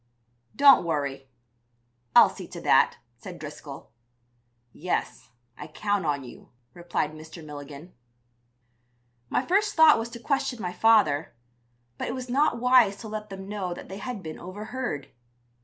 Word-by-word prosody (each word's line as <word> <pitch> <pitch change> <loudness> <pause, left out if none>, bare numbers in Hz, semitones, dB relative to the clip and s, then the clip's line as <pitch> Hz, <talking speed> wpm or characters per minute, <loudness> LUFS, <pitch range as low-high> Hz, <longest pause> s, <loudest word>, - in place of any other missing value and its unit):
"'Don't 280 -6 +7
worry; 140 -5 -3 0.9
I'll - - +9
see - - -9
to - - -9
that,' - - +4 0.2
said - - -10
Driscoll. - - -10 0.8
"'Yes, 180 +4 -3 0.3
I - - -9
count 205 +2 -2
on 145 -2 -1
you,' 125 - -13 0.2
replied 175 -3 -2
Mr. 155 +1 -11
Milligan." 145 +3 -10 1.4
My 255 - 0
first 415 +3 +1
thought 320 -6 +7
was 225 +1 -4
to 235 - -9
question 265 -1 -1
my 180 -3 -4
father, 165 - +3 0.6
but - - -3
it 240 - -3
was 255 -1 -6
not 280 -1 +2
wise 250 -5 +5
to 225 - -9
let 215 0 -6
them 195 0 -8
know 195 -4 -4
that - - -11
they 195 +1 -7
had 235 -2 -6
been 155 -1 -7
overheard. 195 - -6
195 Hz, 145 wpm, -26 LUFS, 155-240 Hz, 1.4 s, I'll